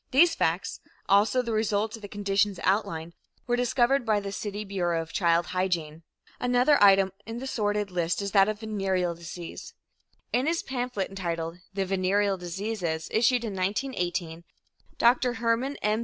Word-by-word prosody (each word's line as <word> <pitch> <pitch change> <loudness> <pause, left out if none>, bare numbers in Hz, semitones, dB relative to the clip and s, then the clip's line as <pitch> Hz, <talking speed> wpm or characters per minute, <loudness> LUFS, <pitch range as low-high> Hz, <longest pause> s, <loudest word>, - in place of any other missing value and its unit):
These 330 +6 +5
facts, 165 +3 -1 0.3
also 205 +6 +4
the 235 - -3
result 215 0 0
of 225 - -12
the 205 - -7
conditions 200 -1 0
outlined, 170 -4 0 0.3
were 245 - +1
discovered 245 +2 +2
by 215 -3 +2
the 200 -1 -5
city 205 +1 -4
Bureau 175 -4 -1
of 165 0 -6
Child 170 -2 +2
Hygiene. 170 -4 -1 0.4
Another 250 +4 +3
item 195 -1 +6 0.2
in 225 +1 -5
the 255 - -5
sordid 210 -5 -1
list 175 -1 0
is 200 -1 -3
that 195 0 +5
of 215 0 -4
venereal 190 -5 -1
disease. 170 0 -9 0.6
In 250 +4 +2
his 335 +1 0
pamphlet 245 -6 -3
entitled 170 -3 -4 0.2
"The 195 -1 0
Venereal 195 +1 +1
Diseases," 180 -2 -3
issued 240 +2 +3
in 215 - -4
1918, 180 -5 -2 0.5
Dr. 245 +1 +3
Hermann 235 +4 0
M. 210 +1 +2
200 Hz, 155 wpm, -27 LUFS, 180-230 Hz, 0.6 s, item